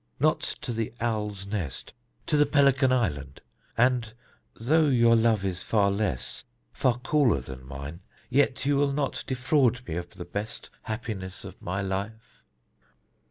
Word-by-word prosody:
Not - - +3 0.2
to 120 - -3
the 115 -1 -2
Owl's 105 -4 -2
Nest: 95 -10 -4 0.3
to - - +1
the 150 -1 +5
Pelican 140 -2 +4
Island. 75 - -1 0.4
And 120 -2 +3 0.4
though 155 +7 +3
your 120 -4 +5
love 110 -3 +3
is 90 -2 -1
far 100 -3 +2
less, 100 - -2 0.3
far 125 -2 +2
cooler 135 - +2
than 65 0 -9
mine, 70 +4 -7 0.3
yet 135 +2 +2
you 145 0 +3
will 140 0 +2
not 140 -1 -1
defraud 130 -2 +2
me 80 - -3
of 85 0 -5
the 90 -1 -9
best 105 +5 -5
happiness 105 -5 -5
of - - -10
my 95 +2 -2
life?" 105 +5 -5
110 Hz, 150 wpm, -27 LUFS, 95-130 Hz, 0.4 s, the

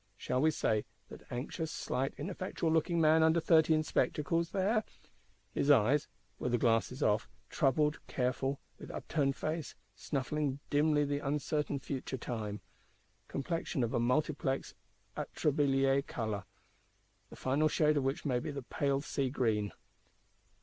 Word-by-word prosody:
Shall 125 - -1
we 155 - +5
say, 110 -8 +1 0.3
that - - -12
anxious, 155 +6 -3
slight, 135 +2 -2
ineffectual 180 -3 -2
looking 165 +2 +2
man, 160 0 +5
under 160 +1 +5
thirty, 160 -1 +5
in 155 - +1
spectacles; 165 +2 0 1.0
his 140 - 0
eyes 140 +3 +5 0.3
(were - - -1
the 120 - +2
glasses 120 +4 +1
off) 105 0 +2 0.2
troubled, 150 +3 +2
careful; 135 +2 -1 0.2
with - - -9
upturned 140 -4 -1
face, 155 -3 -3 0.2
snuffing 140 +5 -2
dimly 150 0 +3
the 145 0 -1
uncertain 145 +1 -1
future 135 -1 -4
time; 110 -4 -4 0.7
complexion 165 -1 -2
of 115 - -1
a - - +2
multiplex 135 +2 0 0.4
atrabiliar 135 -2 +2
colour, 105 -4 -3 0.8
the - - -11
final 140 +4 +2
shade 150 0 +3
of 145 - +1
which 135 +6 -1
may 125 -4 +1
be 125 - -5
the 140 -2 -5
pale 140 +2 0
sea 140 -2 -1
green. 110 -6 0
140 Hz, 135 wpm, -33 LUFS, 125-155 Hz, 1.0 s, we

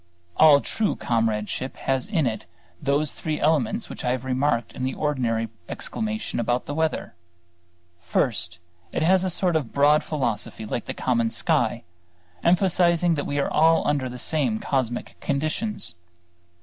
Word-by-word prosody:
All 150 -3 +7
true 220 -2 -1
comradeship 115 +2 -1
has 135 +4 -1
in 175 -9 +1
it 110 -5 -2 0.4
those 145 +1 +1
three 155 -1 -3
elements 145 -7 +1
which - - -8
I - - 0
have 130 0 -4
remarked 130 -2 0
in 130 - -5
the 130 - -1
ordinary 120 -7 0 0.2
exclamation 220 - -3
about 120 +2 0
the 145 - -4
weather. 160 - -1 0.9
First, 85 -3 -1 0.3
it - - -1
has 185 +2 +4
a 190 - 0
sort 180 -1 +1
of 145 -7 -1
broad 145 +2 +4
philosophy 115 -6 -3
like 110 +2 -3
the - - -5
common 115 -3 +1
sky, 115 - 0 0.6
emphasizing 175 -1 +3
that 145 -3 -2
we 145 - -2
are 140 - 0
all 165 +1 +4
under 140 -3 0
the 125 - -7
same 160 - 0
cosmic 130 - -2
conditions. 155 - -2
140 Hz, 150 wpm, -24 LUFS, 120-160 Hz, 0.9 s, All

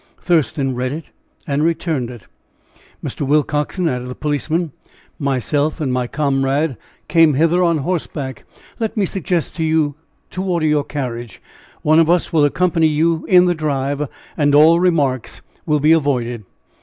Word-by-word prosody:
Thurston 145 -5 0
read 125 +1 -2
it 155 +2 -7 0.3
and 145 +1 0
returned 160 -6 -1
it. 120 -5 -11 0.8
"Mr. - - -6
Willcoxen," 150 +4 0
added 125 -4 -2
the 125 - -6
policeman, 155 +2 -1 0.5
"myself 145 +3 0
and 135 -5 -1
my 125 -1 -1
comrade 140 +1 0 0.3
came 165 -4 +4
hither 165 +5 +3
on 170 -2 +3
horseback. 145 -5 -4 0.4
Let 225 -1 -2
me 205 - +2
suggest 180 -2 -2
to 165 - -1
you 155 -2 +1 0.4
to 185 - -4
order 175 -4 0
your 150 -1 +2
carriage. 120 -6 -5 0.4
One 155 +1 +4
of 165 -1 +3
us 175 0 +1
will 155 -3 +4
accompany 165 +1 +2
you 160 +2 0
in 180 -1 +6
the 175 - +2
drive, 145 -2 -2 0.3
and 145 -2 +2
all 160 +3 +6
remarks 145 -9 0 0.2
will 150 -1 +2
be 150 +2 +3
avoided." 125 -8 +1
150 Hz, 155 wpm, -19 LUFS, 135-165 Hz, 0.8 s, in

